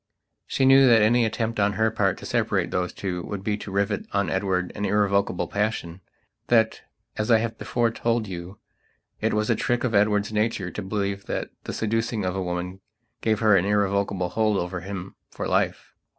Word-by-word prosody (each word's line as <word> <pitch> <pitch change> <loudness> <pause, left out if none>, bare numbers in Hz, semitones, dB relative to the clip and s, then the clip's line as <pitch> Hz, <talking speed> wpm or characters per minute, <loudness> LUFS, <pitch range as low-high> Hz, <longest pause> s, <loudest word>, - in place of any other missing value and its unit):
She 135 - +1
knew 135 0 +7
that 115 -3 +6
any 120 +2 +4
attempt 115 0 -2
on 100 0 +2
her 110 +1 +1
part 100 -4 +1
to - - -10
separate - - 0
those 90 0 -1
two 90 -3 -4
would 100 +2 -6
be 105 +1 0
to 105 - -8
rivet 100 +1 -1
on 100 -1 +1
Edward 95 -2 0
an 105 - -5
irrevocable 100 -4 +1
passion; 100 -4 -2 0.5
that, 110 -2 +3 0.4
as 110 +1 -1
I 115 - +7
have 110 0 -3
before 120 -1 0
told 115 0 0
you, 90 +1 -7 0.6
it - - 0
was 105 0 +1
a - - +3
trick 120 0 0
of 125 -3 0
Edward's 105 0 +2
nature 105 -4 0
to - - -5
believe 100 0 -3
that - - -3
the - - -4
seducing 115 -1 -1
of 90 0 -1
a 95 - -1
woman 90 +1 -4 0.4
gave 110 -1 +1
her 110 -2 +5
an 95 -1 +3
irrevocable 100 -2 +1
hold 110 +1 +1
over 90 0 -3
him 95 0 -6 0.2
for - - -5
life. - - -1
105 Hz, 195 wpm, -25 LUFS, 95-110 Hz, 0.6 s, knew